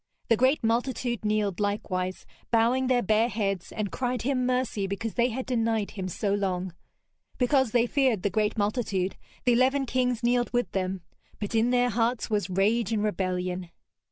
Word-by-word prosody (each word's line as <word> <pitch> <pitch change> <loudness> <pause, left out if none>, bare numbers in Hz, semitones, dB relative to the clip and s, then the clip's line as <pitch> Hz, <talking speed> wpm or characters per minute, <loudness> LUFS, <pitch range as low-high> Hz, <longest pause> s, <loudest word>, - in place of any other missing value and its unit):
The 230 - +6
great 260 +5 +2
multitude 240 0 0
kneeled 210 -3 0
likewise, 185 -3 -2 0.2
bowing 240 +3 +3
their 250 -1 +2
bare 220 +4 +3
heads, 195 -6 -2
and 210 -2 -3
cried 250 -2 -2
him 255 -1 0
mercy 250 -6 0
because 200 +3 -3
they 240 0 +2
had 255 +2 -4
denied 225 -4 0
him 190 -3 -5
so 200 +3 -1
long. 190 -3 -1 0.6
Because 265 0 +3
they 235 +1 +3
feared 255 -6 +1
the 200 - +1
great 215 0 0
multitude, 205 -3 -1 0.3
the 245 - +5
eleven 265 +3 +3
kings 250 -1 0
kneeled 240 0 +2
with 245 -6 0
them, 190 -1 -2 0.4
but 205 0 -4
in 225 +1 +3
their 245 0 +2
hearts 230 +1 0
was 205 -4 0
rage 210 +4 +1
and 215 -2 0
rebellion. 185 -3 -2
225 Hz, 170 wpm, -27 LUFS, 200-245 Hz, 0.6 s, The